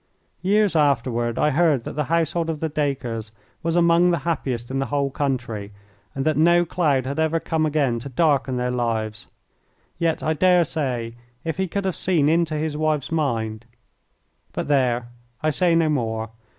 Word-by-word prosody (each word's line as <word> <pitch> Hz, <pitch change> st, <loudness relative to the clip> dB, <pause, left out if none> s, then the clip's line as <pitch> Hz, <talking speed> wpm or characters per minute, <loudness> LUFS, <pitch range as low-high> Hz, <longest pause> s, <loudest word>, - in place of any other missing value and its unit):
Years 205 Hz, 0 st, +2 dB
afterward 120 Hz, -5 st, +1 dB
I 150 Hz, -, +2 dB
heard 150 Hz, -4 st, +2 dB
that -, -, -6 dB
the 150 Hz, -1 st, -1 dB
household 165 Hz, +1 st, 0 dB
of 160 Hz, -2 st, -2 dB
the 160 Hz, -, -1 dB
Dacres 130 Hz, -7 st, -2 dB, 0.3 s
was 165 Hz, 0 st, -1 dB
among 170 Hz, 0 st, +4 dB
the 170 Hz, -, +2 dB
happiest 130 Hz, -8 st, -2 dB
in 135 Hz, -, -1 dB
the 135 Hz, -, -1 dB
whole 140 Hz, -1 st, 0 dB
country, 120 Hz, -8 st, -3 dB, 0.4 s
and 135 Hz, +1 st, -2 dB
that 155 Hz, -2 st, +2 dB
no 175 Hz, +2 st, +4 dB
cloud 150 Hz, -7 st, +1 dB
had 140 Hz, +4 st, -3 dB
ever 160 Hz, +1 st, +1 dB
come 160 Hz, -1 st, 0 dB
again 140 Hz, -6 st, +1 dB
to 135 Hz, +4 st, -7 dB
darken 135 Hz, -2 st, +1 dB
their 125 Hz, 0 st, -1 dB
lives. 110 Hz, -3 st, -2 dB, 0.7 s
Yet 165 Hz, -1 st, 0 dB
I 155 Hz, -, +1 dB
dare 180 Hz, +2 st, +4 dB
say 125 Hz, -8 st, -3 dB, 0.3 s
if 160 Hz, 0 st, -3 dB
he 190 Hz, 0 st, 0 dB
could 200 Hz, +3 st, -3 dB
have 190 Hz, -, -1 dB
seen 160 Hz, -6 st, +2 dB
into 165 Hz, -1 st, +1 dB
his 155 Hz, 0 st, -2 dB
wife's 155 Hz, -2 st, -1 dB
mind 115 Hz, -8 st, -1 dB, 0.9 s
but -, -, -3 dB
there, 125 Hz, -4 st, +1 dB, 0.3 s
I 155 Hz, -, +2 dB
say 170 Hz, +2 st, +2 dB
no 165 Hz, -1 st, +3 dB
more! 110 Hz, -6 st, -1 dB
150 Hz, 175 wpm, -23 LUFS, 125-165 Hz, 0.9 s, among